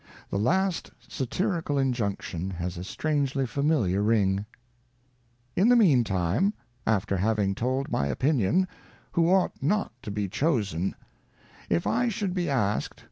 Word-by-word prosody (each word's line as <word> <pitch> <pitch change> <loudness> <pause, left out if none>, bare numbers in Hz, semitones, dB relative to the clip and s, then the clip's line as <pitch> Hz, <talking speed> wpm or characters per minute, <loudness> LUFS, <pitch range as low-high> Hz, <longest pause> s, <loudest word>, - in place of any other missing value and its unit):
The 100 - 0
last 185 - +1 0.2
satirical 165 - -1
injunction 100 -9 -1
has 90 -1 -4
a 90 - -6
strangely 140 +3 -1
familiar 130 - +1
ring: 105 -2 +2 0.5
' 120 0 -39
In 200 +6 +4
the 245 - +7
mean 160 - +5
time, 100 - +1 0.3
after 100 -2 +1
having 100 0 +1
told 130 +6 -1
my 70 - +1
Opinion, 135 - +2 0.4
Who 170 0 +2
ought 190 -1 +2
not 205 +10 +1
to 125 - -7
be 100 0 -2
Chosen: 100 - 0 0.4
' - - -36 0.3
If 85 0 +1
I 245 0 +2
should 200 -4 -2
be 175 -3 -1
ask'd. 105 -6 0
125 Hz, 140 wpm, -27 LUFS, 100-160 Hz, 0.5 s, the